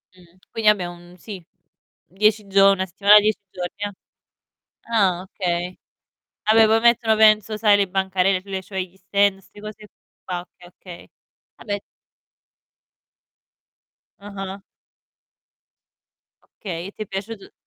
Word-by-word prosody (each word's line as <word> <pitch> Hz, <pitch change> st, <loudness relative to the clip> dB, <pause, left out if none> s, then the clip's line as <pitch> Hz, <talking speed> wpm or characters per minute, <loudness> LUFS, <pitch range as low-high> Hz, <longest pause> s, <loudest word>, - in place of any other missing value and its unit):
Mh, 180 Hz, -1 st, -22 dB
quindi 220 Hz, -1 st, +2 dB
vabbé 205 Hz, -4 st, +2 dB
un 175 Hz, 0 st, -11 dB
sì, 195 Hz, -2 st, -9 dB, 0.6 s
10 210 Hz, +2 st, 0 dB
gio 195 Hz, 0 st, +5 dB
1 190 Hz, -1 st, -1 dB
settimana, 200 Hz, +3 st, +6 dB
10 210 Hz, 0 st, 0 dB
giorni, 180 Hz, -1 st, -6 dB
jà. 205 Hz, 0 st, -4 dB, 1.0 s
Ah 190 Hz, -6 st, +2 dB
okay. 180 Hz, -2 st, -4 dB, 0.7 s
Vabbè 220 Hz, +1 st, +5 dB
poi 225 Hz, +1 st, +3 dB
mettono 235 Hz, -2 st, +3 dB
penso 215 Hz, 0 st, +4 dB
sai 210 Hz, -1 st, +4 dB
le 200 Hz, -1 st, +1 dB
bancarelle 190 Hz, 0 st, 0 dB
sulle 190 Hz, 0 st, -5 dB
cioè 190 Hz, 0 st, -6 dB
gli 185 Hz, 0 st, -9 dB
stand, 195 Hz, +1 st, +1 dB
'ste 195 Hz, -, -18 dB
cose 215 Hz, 0 st, -10 dB, 0.4 s
qua, 180 Hz, -1 st, -4 dB
okay, 180 Hz, 0 st, -18 dB
okay. 175 Hz, -1 st, -13 dB, 0.5 s
Vabbè 205 Hz, -2 st, -5 dB, 2.4 s
Ah-ah. 195 Hz, -1 st, -8 dB, 2.0 s
Okay, 175 Hz, -3 st, -6 dB
e -, -, -10 dB
ti 215 Hz, -, -7 dB
è -, -, -14 dB
piaciut 200 Hz, +2 st, -7 dB
195 Hz, 125 wpm, -22 LUFS, 185-210 Hz, 2.4 s, settimana